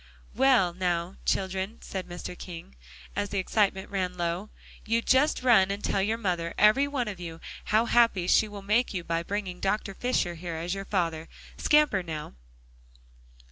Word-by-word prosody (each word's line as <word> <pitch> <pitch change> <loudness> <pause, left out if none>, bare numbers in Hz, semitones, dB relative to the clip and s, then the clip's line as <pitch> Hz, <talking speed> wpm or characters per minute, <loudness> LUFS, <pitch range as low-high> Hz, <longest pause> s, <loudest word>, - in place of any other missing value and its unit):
"Well, 240 -8 +4
now, 175 0 -2
children," 190 +3 -1
said 190 -2 -5
Mr. 175 0 -7
King, 170 - -9 0.4
as 205 0 -1
the 200 - -3
excitement 195 0 0
ran 185 -2 -2
low, 175 +4 -2 0.3
"you 230 +1 0
just 265 +1 +3
run 220 -7 +5
and 200 +1 -4
tell 195 - +1
your 220 +3 0
mother, 175 -6 -2
every 240 +7 +5
one 270 -5 -2
of 200 -4 -5
you, 165 -2 -7 0.3
how 220 +2 +3
happy 230 -7 +3
she 215 - +4
will 205 -1 -9
make 210 +2 +1
you 180 - -2
by 165 0 -1
bringing 190 0 -4
Dr. 195 0 -1
Fisher 220 -5 0
here 170 0 -6
as 170 +3 -3
your 195 0 -5
father. 165 -5 -1 0.3
Scamper, 300 -10 +3
now!" 160 -3 -6
195 Hz, 170 wpm, -28 LUFS, 175-215 Hz, 0.4 s, run